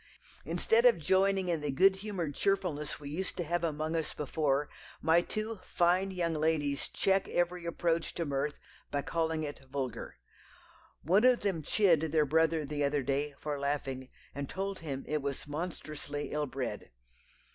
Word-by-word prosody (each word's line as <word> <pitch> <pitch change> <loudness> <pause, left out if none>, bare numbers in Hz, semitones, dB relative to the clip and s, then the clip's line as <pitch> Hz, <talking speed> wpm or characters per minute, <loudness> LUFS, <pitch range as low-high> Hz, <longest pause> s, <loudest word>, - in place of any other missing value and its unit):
Instead 460 +1 +2
of 485 - +5
joining 190 0 +2
in 170 -3 0
the 150 - -2
good 190 +8 +5
humoured 190 -7 -3
cheerfulness 175 -5 0
we 145 - -8
used 185 +5 -3
to 175 - 0
have 170 +1 -1
among 155 0 -1
us 160 -2 -2
before, 145 -1 0 0.3
my 160 +2 +4
two 215 +3 -4
fine 180 +3 +2
young 175 -3 -1
ladies 150 -2 0
check 195 0 +1
every 175 0 0
approach 170 -1 0
to 170 - -1
mirth, 145 +1 -1 0.3
by 145 -1 -1
calling 160 -1 0
it 145 -2 -6
vulgar. 130 - -4 0.9
One 190 - +4
of 255 -1 +5
them 195 -6 0
chid 175 0 +4
their 155 -1 +2
brother 160 +1 +2
the 145 0 -2
other 140 0 +1
day 140 +2 -1
for 145 -1 -3
laughing, 135 -2 -2 0.2
and 140 -1 -4
told 195 0 -3
him 140 -4 -5
it 150 0 0
was 140 +1 -4
monstrously 150 -2 -4
ill 150 0 -1
bred.... 125 -6 -4
160 Hz, 165 wpm, -32 LUFS, 145-180 Hz, 0.9 s, of